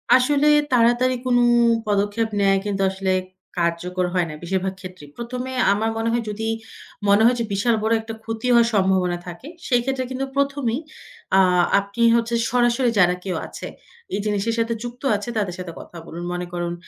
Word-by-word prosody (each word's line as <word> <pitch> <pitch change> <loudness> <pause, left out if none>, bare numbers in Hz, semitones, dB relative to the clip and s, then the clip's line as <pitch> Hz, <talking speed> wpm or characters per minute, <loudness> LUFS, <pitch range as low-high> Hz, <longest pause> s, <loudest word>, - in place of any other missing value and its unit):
আসলে 280 +3 +3 0.2
তাড়াতাড়ি 245 +1 +3
কোনো 245 -1 +3 0.5
পদক্ষেপ 205 +2 0
নেয়াই 195 -1 +3
কিন্তু 200 -1 -2
আসলে 190 0 -2 0.5
কার্যকর 175 +2 -1
হয় 180 -2 +1
না - - -6
বেশিরভাগ 190 +2 -1
ক্ষেত্রেই। 185 -6 -10
১ম 240 +1 -5
এ - - -6 0.2
আমার 220 +2 0
মনে 225 0 0
হয় 235 0 0
যদি 220 +2 -4 0.6
মনে 200 +1 +5
হয় 245 +2 +5
যে, - - 0
বিশাল 225 +4 +2
বড় 220 +1 +2
একটা 225 0 -7
ক্ষতি 225 +2 -4
হওয়ার 235 -1 +5
সম্ভাবনা 190 -3 +2
থাকে 175 +10 -9 0.2
সেই 245 -2 +3
ক্ষেত্রে 265 0 -1
কিন্তু 260 +1 -2
প্রথমেই 275 -3 0 0.6
আ - - +6 0.4
আপনি 200 +3 -6
হচ্ছে 235 0 0 0.2
সরাসরি 240 0 +2
যারা 180 -1 +4
কেউ 185 -3 -3
আছে - - -8 0.5
এই - - -1
জিনিসের 210 +2 0
সাথে 230 0 0
যুক্ত 240 +1 -8
আছে 205 +4 -4
তাদের 195 -5 -1
সাথে 180 -2 -6
কথা 175 - -11
বলুন। 170 +1 -8
মনে 180 0 -3
করুন 175 -1 -2
220 Hz, 180 wpm, -22 LUFS, 190-240 Hz, 0.6 s, আ